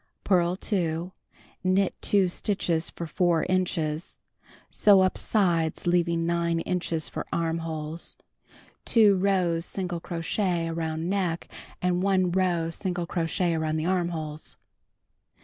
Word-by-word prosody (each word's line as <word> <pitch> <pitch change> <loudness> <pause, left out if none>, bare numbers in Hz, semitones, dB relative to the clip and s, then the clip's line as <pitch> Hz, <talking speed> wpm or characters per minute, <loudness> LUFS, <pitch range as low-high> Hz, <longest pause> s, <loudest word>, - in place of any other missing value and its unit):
Purl 180 -2 +2
2, 175 -3 -1 0.5
knit 185 +1 +2
2 200 -2 +3
stitches 175 -3 0
for 170 - -6
4 170 0 +1
inches. 170 -4 -1 0.5
Sew 200 -2 +5
up 185 0 +2
sides, 170 -7 +1
leaving 170 -1 +2
9 170 0 +1
inches 170 -3 -1
for - - -5
amiholes. 165 -1 -2 0.7
Two 215 -4 +5
rows 180 -3 +1
single 175 -1 -3
crochet 170 +1 -1
around 165 0 -3
neck 180 -3 -1 0.4
and 180 0 +1
1 190 -2 +2
row 175 -3 +1
single 175 0 -2
crochet 170 +1 0
around 160 -1 -1
the 155 - -2
armholes. 170 -4 -1
175 Hz, 115 wpm, -27 LUFS, 165-185 Hz, 0.7 s, Sew